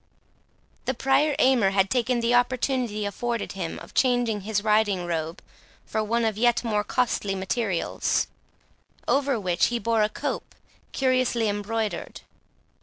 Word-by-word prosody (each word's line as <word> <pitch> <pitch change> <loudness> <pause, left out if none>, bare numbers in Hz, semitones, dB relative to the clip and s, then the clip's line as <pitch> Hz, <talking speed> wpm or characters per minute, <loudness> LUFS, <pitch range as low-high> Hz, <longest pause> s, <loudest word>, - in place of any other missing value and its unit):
The 260 - -1
Prior 270 +4 +2
Aymer 255 -7 +4
had 195 0 +1
taken 245 -1 +1
the 235 +1 +1
opportunity 245 -3 +1
afforded 230 +3 -3
him, 180 -4 -4
of - - -12
changing 245 -5 +2
his 205 0 -1
riding 210 -4 +2
robe 165 -1 -3 0.4
for 220 - -1
one 230 +2 0
of 215 -1 -1
yet 240 +1 +3
more 210 -3 0
costly 210 -5 0
materials, 190 -1 0 0.8
over 275 -3 +2
which 180 -3 +2
he 240 - -1
wore 230 0 +1
a 210 - +2
cope - - -4 0.4
curiously 255 -3 +1
embroidered. 210 +1 -3
225 Hz, 135 wpm, -25 LUFS, 205-245 Hz, 0.8 s, Aymer